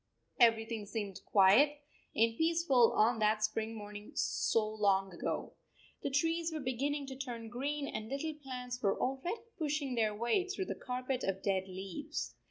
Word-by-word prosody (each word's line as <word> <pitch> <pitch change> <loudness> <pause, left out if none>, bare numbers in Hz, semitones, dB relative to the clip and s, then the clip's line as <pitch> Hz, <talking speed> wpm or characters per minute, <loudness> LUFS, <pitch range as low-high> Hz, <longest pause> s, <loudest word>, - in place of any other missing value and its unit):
Everything 225 -2 +3
seemed 205 -3 -4
quiet 220 +10 +6 0.4
and 225 0 +3
peaceful 320 -6 +4
on 225 +2 +3
that 215 0 +2
spring 220 +1 -1
morning 210 -1 -8
so 220 -2 +1
long 200 -3 +1
ago. 170 - -3 0.5
The - - -1
trees 325 +4 +1
were 315 - -3
beginning 280 +2 -1
to 270 -1 -7
turn 240 -4 -6
green 280 +4 -2
and 215 0 -5
little 295 +3 -2
plants 250 -4 -6
were 195 -2 +1
already 275 - -1 0.2
pushing 295 -3 -1
their 220 -3 +1
way 235 - +1
through 380 0 -2
the - - -3
carpet 255 0 -3
of 195 0 -2
dead 190 -1 0
leaves. 185 -11 -5
240 Hz, 160 wpm, -34 LUFS, 215-280 Hz, 0.5 s, quiet